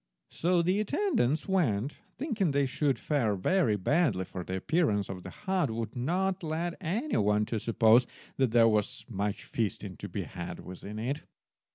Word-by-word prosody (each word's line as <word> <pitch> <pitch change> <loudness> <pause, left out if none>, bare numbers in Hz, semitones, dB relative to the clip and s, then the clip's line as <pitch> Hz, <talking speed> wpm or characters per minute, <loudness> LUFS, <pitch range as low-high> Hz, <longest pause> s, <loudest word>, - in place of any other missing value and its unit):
So 175 0 +2
the 185 +4 +2
attendants 215 - +1
went, 145 - +1 0.2
thinking 225 - 0
they 140 0 +2
should 135 +1 0
fare 120 -9 0
very 115 - +2
badly, 105 - +1
for 90 -1 -6
the 95 - -4
appearance 105 - +1
of 95 -1 -5
the - - -8
hut 190 -6 -1
would 115 +2 -4
not 185 +9 0
have 160 - -4
led 170 +2 -2
any 210 - -1
one 105 +1 +3
to 110 +1 -2
suppose 115 +2 +4 0.3
that 130 -2 +3
there 115 0 +5
was 105 -2 0
much 105 -2 -2
feasting 110 -5 -3
to - - -7
be - - -3
had - - -7
within 100 +3 -8
it. 130 +7 -2
135 Hz, 175 wpm, -30 LUFS, 105-175 Hz, 0.3 s, there